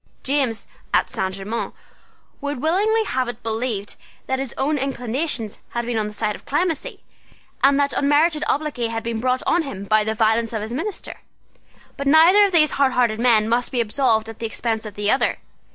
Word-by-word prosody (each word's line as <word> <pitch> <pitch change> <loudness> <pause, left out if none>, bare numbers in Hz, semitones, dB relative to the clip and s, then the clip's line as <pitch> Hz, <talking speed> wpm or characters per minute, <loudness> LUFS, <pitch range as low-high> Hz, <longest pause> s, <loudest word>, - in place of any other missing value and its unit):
James, 265 -5 0 0.3
at - - +2
Saint 190 0 -2
Germain's 205 +4 -4 0.7
would 285 -2 -3
willingly 410 - +2
have 260 - -1
had 240 - -4
it 240 - -34
believed 225 -2 -3 0.3
that 265 0 -1
his 270 -3 -3
own 290 +2 0
inclinations 250 -2 -2
had 235 0 -3
been 235 -2 -1
on 210 - -1
the - - -6
side 210 0 -1
of - - -11
clemency, 345 - -2 0.6
and 275 +1 +4
that 285 0 +1
unmerited 300 +2 +2
obloquy 285 -5 -1
had 225 0 -4
been 230 -1 -3
brought 255 +2 0
on 345 - +3
him 270 -11 -6
by 215 +1 +3
the 220 +1 -2
violence 225 +1 +1
of 220 - -2
his 220 +2 -5
minister. 380 +10 -5 0.8
But 280 - -3
neither 330 +8 +7
of 400 - 0
these 310 -4 +4
hardhearted 250 -5 +2
men 230 -3 +4
must 235 +2 0
be 250 - -1
absolved 225 -1 +1
at 225 -1 -9
the 230 - -2
expense 225 0 -2
of 205 - -10
the 205 0 +1
other. 265 - +1
245 Hz, 195 wpm, -22 LUFS, 220-285 Hz, 0.8 s, neither